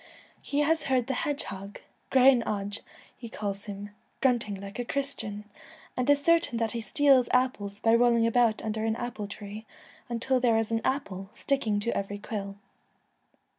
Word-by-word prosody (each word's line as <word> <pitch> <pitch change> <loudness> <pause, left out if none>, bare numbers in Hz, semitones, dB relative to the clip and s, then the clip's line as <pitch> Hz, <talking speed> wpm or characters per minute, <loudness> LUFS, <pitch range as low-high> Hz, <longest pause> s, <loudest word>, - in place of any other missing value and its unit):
He 290 +1 -1
has 320 +2 +2
heard 255 -3 +2
the 270 - -2
hedgehog 205 -10 -4
— - - -40
' - - -42
grainne 260 -1 +6
oge,' 205 0 -2 0.4
he 235 - -9
calls 200 -2 -4
him 205 0 -7
— - - -41
'grunting 235 -6 +1
like 200 +3 -8
a - - 0
Christian,' 235 -6 -2 0.5
and 250 +2 -1
is 285 0 +4
certain 335 -7 +3
that 225 -1 0
he 235 - -3
steals 260 +3 +4
apples 210 -6 0
by 225 - +4
rolling 235 -1 +4
about 230 -1 +2
under 220 0 -2
an 220 0 +1
apple 230 -4 -4
tree 210 +1 -8 0.4
until 250 +2 +1
there 235 -3 +3
is 225 0 -1
an 225 0 +1
apple 195 -9 -2
sticking 230 -7 0
to 235 - 0
every 200 +1 -3
quill. 200 -1 -5
230 Hz, 175 wpm, -28 LUFS, 205-255 Hz, 0.5 s, grainne